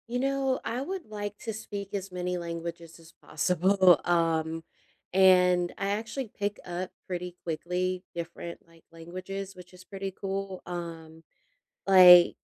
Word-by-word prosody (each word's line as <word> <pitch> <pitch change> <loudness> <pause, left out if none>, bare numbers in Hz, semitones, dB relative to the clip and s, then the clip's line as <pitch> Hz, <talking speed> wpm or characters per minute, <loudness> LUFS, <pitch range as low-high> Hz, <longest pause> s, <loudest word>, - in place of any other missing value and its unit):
You 245 +1 -2
know, 270 0 0
I 245 +3 -2
would 370 +5 -5
like 205 -1 -6
to 225 - -5
speak 205 -2 -7
as 195 -1 -4
many 180 0 -2
languages 170 -1 -6
as 165 0 -17
possible, 180 +2 +4
um, 165 -1 +1 0.5
and 180 -2 +5
I 195 0 -1
actually 225 +4 -3
pick 205 0 -2
up 180 +1 -4 0.2
pretty 180 -1 -4
quickly 180 +2 -2
different, 170 0 -6
like, 165 -1 -22
languages, 185 +4 -7
which 180 0 -14
is 180 0 -14
pretty 195 0 -5
cool, 195 -1 -4
um, 165 -2 -7 0.6
like, 180 -2 +9
180 Hz, 140 wpm, -28 LUFS, 170-195 Hz, 0.6 s, like